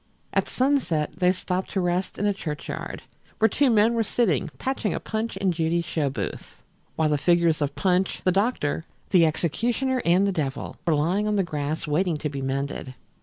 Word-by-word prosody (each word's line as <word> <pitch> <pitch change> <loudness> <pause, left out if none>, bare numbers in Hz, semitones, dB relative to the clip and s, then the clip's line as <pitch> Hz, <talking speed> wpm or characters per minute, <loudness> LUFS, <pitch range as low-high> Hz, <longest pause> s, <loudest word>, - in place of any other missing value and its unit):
At - - +1
sunset 250 - +1
they 180 0 +4
stopped 185 0 -2
to 195 - +1
rest 180 +1 -1
in 205 - -1
a 205 - +3
churchyard, 155 -6 -5 0.3
where 220 - +5
two 270 +6 +2
men 225 0 +4
were 230 - +1
sitting 205 - +1
patching 260 -5 -1
a - - -2
Punch 220 -2 -3
and 195 -2 +1
Judy 165 +1 0
show 160 -4 -1
booth, 135 - -6 0.3
while 160 -1 +2
the 150 -1 +1
figures 170 -1 +3
of 145 -1 -1
Punch, 185 -1 +1
the 185 - +3
doctor, 195 -6 0 0.3
the 170 -4 +6
executioner 240 - 0
and 180 +3 +4
the 200 - +2
devil 140 -6 -3
were 165 - +4
lying 180 +8 +1
on 210 - +1
the 195 - +2
grass 155 -2 -3
waiting 165 +2 +1
to 150 0 -3
be 140 -1 -5
mended. 135 -1 -3
180 Hz, 190 wpm, -25 LUFS, 155-205 Hz, 0.3 s, the